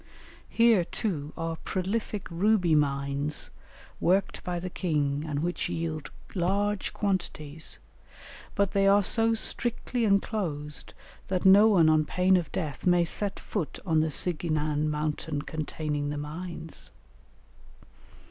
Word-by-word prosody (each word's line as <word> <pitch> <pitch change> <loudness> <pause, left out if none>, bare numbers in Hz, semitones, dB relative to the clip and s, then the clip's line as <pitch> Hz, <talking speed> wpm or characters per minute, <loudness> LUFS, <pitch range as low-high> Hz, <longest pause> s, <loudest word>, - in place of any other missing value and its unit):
Here, 230 -5 +4
too, 155 -6 -3
are 165 -1 -3
prolific 200 +3 -3
ruby 180 -1 +3
mines 140 0 0 0.5
worked 190 +3 +1
by 175 -1 -2
the 180 +1 -5
king 150 -6 0
and 145 -1 -2
which 175 +1 -2
yield 160 -2 -3 0.2
large 200 +2 0
quantities, 165 -6 -2 0.8
but 200 -1 +1
they 195 -1 +3
are 200 +1 +5
so 225 +3 +2
strictly 240 +1 +1
enclosed 185 -8 -1 0.3
that 185 -1 -1
no 200 +3 +8
one 180 -7 +5
on 155 -1 +4
pain 185 +4 +3
of 170 -6 0
death 155 -1 -3
may 175 -1 +4
set 200 +4 -4
foot 180 -8 -4
on 160 -3 +2
the 160 0 +1
Sighinan 155 -2 0
mountain 150 0 -2
containing 150 -2 -3
the 145 - -3
mines. 160 +2 -6
170 Hz, 125 wpm, -28 LUFS, 150-195 Hz, 0.8 s, no